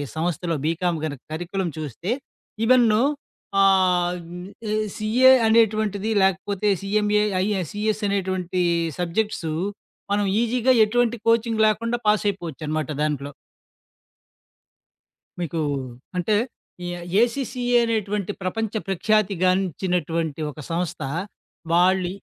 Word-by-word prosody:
సంస్థలో 170 +1 -1
బీకామ్ 170 +1 0
గన 155 -2 -2 0.2
కరికులం 175 +3 -3
చూస్తే. 155 - -4 0.5
ఇవెన్నో. 235 -3 +5 0.6
ఆహ్, 180 -2 +3
హ్మ్. 180 +1 -8 0.2
ఏ - - +1 0.2
సీఏ 245 +5 +5 0.2
అనేటువంటిది. 215 -2 +2
లేకపోతే 195 +2 +1
సీఎంఏ 210 +1 +2 0.2
ఐఎస్ 195 -6 -1
సీఎస్ 215 +1 -1
అనేటువంటి 185 -2 -1 0.4
సబ్జెక్ట్స్. 180 0 -1 0.6
మనం 205 0 +2 0.2
ఈజీగా 245 +2 +2
ఎటువంటి 240 +1 +1
కోచింగ్ 230 -1 +3
లేకుండా 230 +3 0
పాస్ 210 0 +3
అయిపోవచ్చునమాట 155 -5 -4
దాంట్లో. 145 -2 -1 2.1
మీకు 165 -1 -2 0.6
అంటే 205 +4 +1 0.5
ఈ - - -3 0.3
ఏసీసీఏ 245 0 0
అనేటువంటి 210 -3 -1
ప్రపంచ 220 +3 -2 0.2
ప్రఖ్యాతిగానించినటువంటి 185 -5 0
ఒక 150 - -14
సంస్థ. 170 -1 -2 0.7
వాళ్ళు 180 +1 +3
195 Hz, 95 wpm, -23 LUFS, 175-215 Hz, 2.1 s, ఇవెన్నో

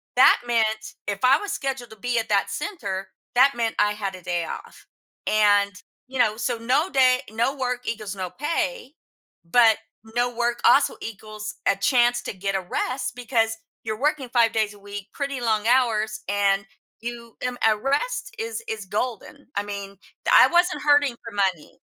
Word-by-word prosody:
that - - +7
meant- 220 -2 0
if 200 -1 -2
I 265 +3 +6
was 410 - -5
scheduled 265 -3 -3
to 220 - -10
be 245 +2 0
at 225 -1 -4
that 200 -1 +2
center- 195 - -4 0.3
that 270 +3 +6
meant 230 -1 -1
I 210 - +3
had 200 -2 -4
a 185 - -11
day 175 -1 -2
off. - - -9 0.4
And, 205 -1 +4 0.4
you 265 0 -6
know, 215 -3 +3
so 240 0 -1
no 260 +10 +1
day 255 -2 +4
no 235 +5 0
work 250 -2 -3
equals 215 -3 -4
no 185 -2 -4
pay, 305 - -3 0.5
but 225 +5 +5 0.4
no 245 0 +1
work 240 0 0
also 280 - +5
equals 215 -1 -7
a 200 - +4
chance 240 +2 +3
to - - -4
get 195 +1 -3
a 190 - 0
rest 255 +7 -3
because 225 -2 0 0.3
you're 220 -1 -4
working 290 -3 0
5 235 -2 +3
days 215 -2 0
a - - -16
week, 205 0 -8
pretty 280 -3 -3
long 220 -2 +1
hours, 225 -4 +2
and 200 -1 +2 0.4
you 235 -1 -7
m 250 -1 -2
a 220 - +4
rest 295 - -1
is 455 0 -4
is 215 -3 -4
golden, 215 +3 -4
I 200 - 0
mean, 200 -1 -6 0.3
d - - +1
I - - +9
wasn't 350 -3 +2
hurting 290 -3 +4
for 230 - -6
money. 190 -6 -1
230 Hz, 180 wpm, -24 LUFS, 205-255 Hz, 0.5 s, I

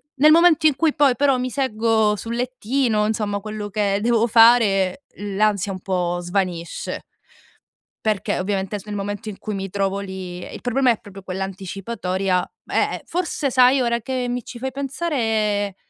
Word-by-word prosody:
Nel 300 +3 +6
momento 330 -2 +6
in 290 - +2
cui 320 -1 +2
poi 275 -4 +3
però 275 -2 +3
mi 255 0 -2
seggo 220 -4 +1
sul 230 +3 -5
lettino, 245 -2 0
insomma, 210 -2 -1
quello 210 0 -6
che 200 -1 0
devo 235 0 +2
fare, 225 -2 +5
l'ansia 205 0 0
un 185 - -5
po' 175 -2 -1
svanisce 175 -2 -3 1.0
perché 215 -3 0
ovviamente 195 +1 -2
s - - -13
nel 210 -1 -5
momento 205 +1 -4
in 195 - -9
cui 210 -2 -4
mi 195 0 -4
trovo 195 0 -1
lì 185 -2 -7
ehm, - - -9
il - - -7
problema 250 +1 +2
è 225 - -2
proprio 195 -1 -12
quell'anticipatoria 190 0 -2 0.2
eh, - - +1
eh, - - -8
forse 335 -5 -2
sai 255 +1 +5
ora 235 -1 0
che 255 0 -2
mi 245 -1 -3
ci 240 - -9
fai 265 +1 -3
pensare 225 - -1
215 Hz, 170 wpm, -22 LUFS, 195-250 Hz, 1.0 s, Nel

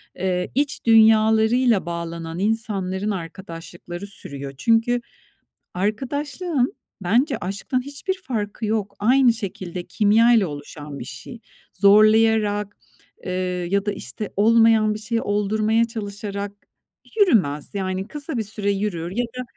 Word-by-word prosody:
Eee, 180 -1 -2
iç 285 0 -1
dünyalarıyla 220 0 +5
bağlanan 170 -1 -5
insanların 205 -2 -1
arkadaşlıkları 175 0 -7
sürüyor. 140 -8 -7
Çünkü 230 - +2 0.7
arkadaşlığın 270 - -1 0.3
bence 245 - +2
aşktan 200 +7 -3
hiçbir 375 +7 -4
farkı 220 - -4
yok. 210 -2 -2
Aynı 245 +3 +4
şekilde, 185 -5 -6
kimyayla 220 +2 +4
oluşan 145 -1 -8
bir - - -6
şey. 235 - -9 0.3
Zorlayarak, 210 0 +4 0.5
eee, 185 - -3 0.4
ya 200 0 +1
da, 205 - 0
işte, 205 +1 -6
olmayan 225 0 +4
bir 210 - -6
şeyi 230 +2 -2
oldurmaya 215 +2 +1
çalışarak 205 -2 -5 0.7
yürümez. 180 - +3
Yani, 190 -1 -3
kısa 295 -1 -5
bir 225 - 0
süre 205 -1 -2
yürür 195 -4 -2
ya 240 +5 -1
da 250 +2 -7
210 Hz, 115 wpm, -22 LUFS, 190-230 Hz, 0.7 s, dünyalarıyla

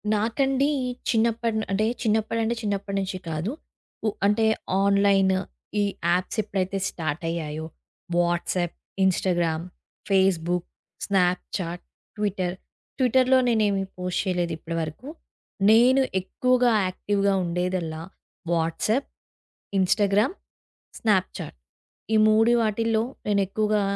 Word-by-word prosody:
నాకండి 270 +6 +1 0.4
చిన్నప్ప 230 0 +2 0.3
అంటే 205 +2 +1 0.2
చిన్నప్పడు 220 0 +1
నుండి 225 +1 0
చిన్నప్పటి 200 -1 -2
నుంచి 190 0 -3
కాదు. 160 +7 -2 0.6
ఉ - - +4 0.2
అంటే 210 +2 +3 0.4
ఆన్‌లైన్‌, 200 -1 +4 0.4
ఈ - - +3 0.3
యాప్స్ 180 +5 0
ఎప్పుడైతే 195 -2 -2
స్టార్ట్ 160 -1 -4
అయ్యాయో, 160 -2 -4 0.5
WhatsApp, 175 0 0 0.3
Instagram, 175 -3 +1 0.4
Facebook, 180 -3 +2 0.4
Snapchat, 180 -2 -1 0.3
Twitter 190 -4 -1 0.4
ట్విట్టర్‌లో 260 +1 +4
నేనేమి 210 -4 +2
పోస్ట్ 180 0 -1
చేయలేదు 175 -2 -1
ఇప్పడి 165 +1 -5
వరకు. 160 - -6 0.6
నేను 250 +4 +6 0.2
ఎక్కువగా 250 +5 +2
యాక్టి‌వ్‌గా 200 +2 0
ఉండేదల్లా 175 -2 -2 0.5
వాట్సాప్, 170 - 0 0.7
ఇన్‌స్టాగ్రామ్, 205 - +2 0.6
స్నాప్ 195 -5 +2
చాట్ 155 - -7 0.6
ఈ - - +5
3 220 +2 +4
వాటిల్లో 220 +1 +1 0.2
నేను 205 -1 +2
ఎక్కువగా... 210 +1 +1
195 Hz, 100 wpm, -25 LUFS, 175-220 Hz, 0.7 s, నేను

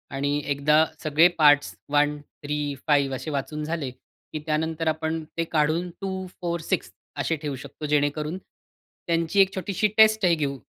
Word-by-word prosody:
आणि 140 +1 0
एकदा 150 +2 +3 0.2
सगळे 155 +3 +5
पार्ट्स 145 -2 +5
1, 145 0 +2 0.3
3, 145 -1 -2
5 145 -2 +4
असे 145 - -6
वाचून 150 +2 -3
झाले 155 -3 -3
की 130 +4 -11
त्यानंतर, 160 +1 -1
आपण 160 +1 -1
ते 165 - +1
काढून 160 +3 +1
2, 190 -1 -3 0.2
4, 170 -1 -1
6 - - -2 0.3
असे 165 - 0
ठेवू 145 -3 -3
शकतो 140 +3 -9
जेणेकरून, 150 +2 0 0.7
त्यांची 170 +3 +1
एक 195 0 +3
छोटीशी 195 +2 0
टेस्टही 215 -5 +5
घेऊ 140 -3 -2
155 Hz, 150 wpm, -25 LUFS, 145-170 Hz, 0.7 s, सगळे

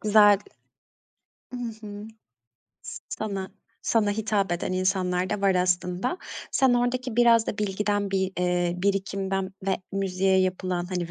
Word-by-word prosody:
güzel. 205 -1 +6 1.1
Hı - - -4 0.3
hı. 205 +1 -8 0.8
S - - -8 0.8
sana 215 -3 +2
hitap 205 -3 0
eden 175 +1 -2
insanlar 185 -1 0
da 210 -1 -1
var 195 -1 +3
aslında. 180 - 0 0.3
Sen 260 -2 +3
oradaki 245 0 0
biraz 235 -2 +5
da - - -3
bilgiden, 205 0 0
bir, 190 -1 0
eee, 180 -1 +1
birikimden 195 -1 -1
ve 190 - +2 0.2
müziğe 190 -1 +1
yapılan, 185 -1 -1
hani 175 -2 -3
195 Hz, 125 wpm, -26 LUFS, 185-210 Hz, 1.1 s, güzel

